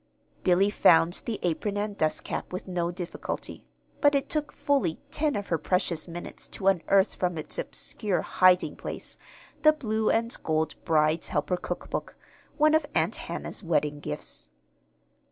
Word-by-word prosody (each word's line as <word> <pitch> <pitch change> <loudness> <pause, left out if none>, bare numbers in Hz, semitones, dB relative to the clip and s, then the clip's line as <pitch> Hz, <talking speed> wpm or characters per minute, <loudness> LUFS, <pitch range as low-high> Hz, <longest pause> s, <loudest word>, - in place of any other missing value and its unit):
Billy 190 +3 +4
found 165 -2 +5
the 225 -3 -1
apron 200 +4 -1
and 205 0 -2
dust 155 -5 0
cap - - -4
with 185 +1 -5
no 175 -2 -1
difficulty; 175 0 -5 0.4
but 290 0 +5
it 275 - 0
took 300 -1 -1
fully 275 - +1
ten 300 -3 0
of 205 -1 -4
her 165 - +1
precious 175 0 0
minutes 175 0 -6
to 190 - -6
unearth 195 +1 +3
from 180 -2 -1
its 155 - -2
obscure 210 - -1
hiding 185 0 +4
place - - -5 0.4
the 310 - +8
blue 220 -7 0
and 230 +1 +1
gold 155 -1 0
"Bride's 155 -1 +2
Helper" 180 - 0
cookbook, 180 - -5 0.4
one 305 0 +5
of 315 -2 +3
Aunt - - +2
Hannah's - - -5
wedding 150 -3 0
gifts. 75 - -5
185 Hz, 155 wpm, -27 LUFS, 165-220 Hz, 0.4 s, the